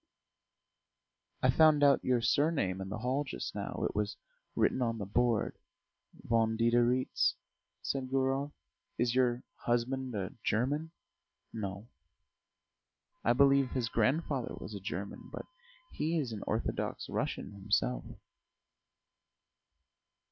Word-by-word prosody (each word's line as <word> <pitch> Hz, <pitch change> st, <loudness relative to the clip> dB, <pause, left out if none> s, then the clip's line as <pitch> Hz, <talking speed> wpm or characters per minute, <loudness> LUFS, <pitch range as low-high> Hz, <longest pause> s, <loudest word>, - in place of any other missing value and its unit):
"I 130 Hz, -, +6 dB
found 155 Hz, +1 st, +5 dB
out 140 Hz, -1 st, +5 dB
your 125 Hz, -2 st, +2 dB
surname 135 Hz, -, +1 dB
in 95 Hz, -, -5 dB
the 105 Hz, -, -3 dB
hall 130 Hz, +6 st, 0 dB
just 145 Hz, -, -5 dB
now: -, -, -4 dB
it -, -, -8 dB
was 105 Hz, 0 st, -1 dB, 0.4 s
written 130 Hz, -, +2 dB
on 115 Hz, -2 st, 0 dB
the 105 Hz, -, -4 dB
board 115 Hz, +1 st, +1 dB, 0.6 s
Von 115 Hz, -1 st, +2 dB
Diderits," 120 Hz, +2 st, +3 dB, 0.5 s
said 135 Hz, -2 st, -2 dB
Gurov. 135 Hz, +2 st, +1 dB, 0.5 s
"Is 120 Hz, -1 st, +1 dB
your 125 Hz, -1 st, +2 dB
husband 125 Hz, +1 st, -1 dB
a 95 Hz, -2 st, -3 dB
German?" 145 Hz, +9 st, 0 dB, 0.6 s
"No; 100 Hz, 0 st, -5 dB, 1.4 s
I 120 Hz, -, +4 dB
believe 140 Hz, 0 st, +5 dB
his 120 Hz, -4 st, 0 dB
grandfather 135 Hz, -1 st, 0 dB
was -, -, -8 dB
a 100 Hz, -, -5 dB
German, 100 Hz, 0 st, -6 dB
but -, -, -6 dB, 0.5 s
he 160 Hz, +2 st, -1 dB
is 135 Hz, -7 st, -1 dB
an 105 Hz, -2 st, -5 dB
Orthodox -, -, -2 dB
Russian -, -, -3 dB
himself." 95 Hz, -12 st, 0 dB
120 Hz, 120 wpm, -32 LUFS, 105-135 Hz, 1.4 s, I